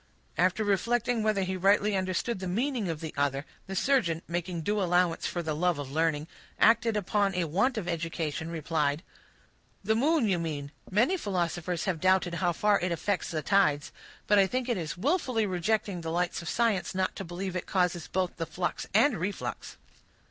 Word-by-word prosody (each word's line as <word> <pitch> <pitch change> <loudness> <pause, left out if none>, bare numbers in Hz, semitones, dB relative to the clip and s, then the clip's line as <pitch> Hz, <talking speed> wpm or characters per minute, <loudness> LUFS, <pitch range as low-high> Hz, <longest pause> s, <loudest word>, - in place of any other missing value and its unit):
After 185 +6 +2
reflecting 230 +4 +1
whether 215 -2 +1
he 190 0 -2
rightly 200 +2 +3
understood 190 +4 -1
the 185 - -4
meaning 230 +1 -1
of 160 -2 -4
the 160 -1 -5
other, 140 0 0 0.2
the 195 - -5
surgeon, 180 -10 +1
making 175 0 -3
due 205 +5 0
allowance 175 -2 +2
for 175 - -3
the 155 -2 -2
love 175 0 +1
of 140 -2 -6
learning, 155 0 0 0.3
acting 225 -1 +4
upon 200 -1 +1
a 180 - +1
want 200 - +1
of 195 -5 -3
education, 165 -2 -3
replied,— 155 -2 -1 0.8
"The 220 +3 +2
moon, 280 +1 +3
you 185 -4 +1
mean; 145 -4 -4 0.2
many 240 - +3
philosophers 175 - -2
have 175 -5 -1
doubted 185 -1 +3
how 175 +1 +1
far 205 +4 +2
it 180 0 -1
affects 185 +3 -1
the 155 -2 -3
tides; 150 -8 +2 0.3
but 205 -1 +4
I 195 - +5
think 255 +3 -2
it 240 -4 0
is 160 -1 -4
willfully 255 - +1
rejecting 190 0 -1
the 165 - -4
lights 175 +2 -1
of 170 - -5
science 225 -6 0
not 190 0 0
to - - -4
believe 180 +2 -5
it 180 - -3
causes 180 -3 0
both 185 -1 -2
the 165 -2 -3
flux 175 +3 -3
and 230 - +4
reflux." 195 +4 -4
185 Hz, 185 wpm, -29 LUFS, 165-210 Hz, 0.8 s, I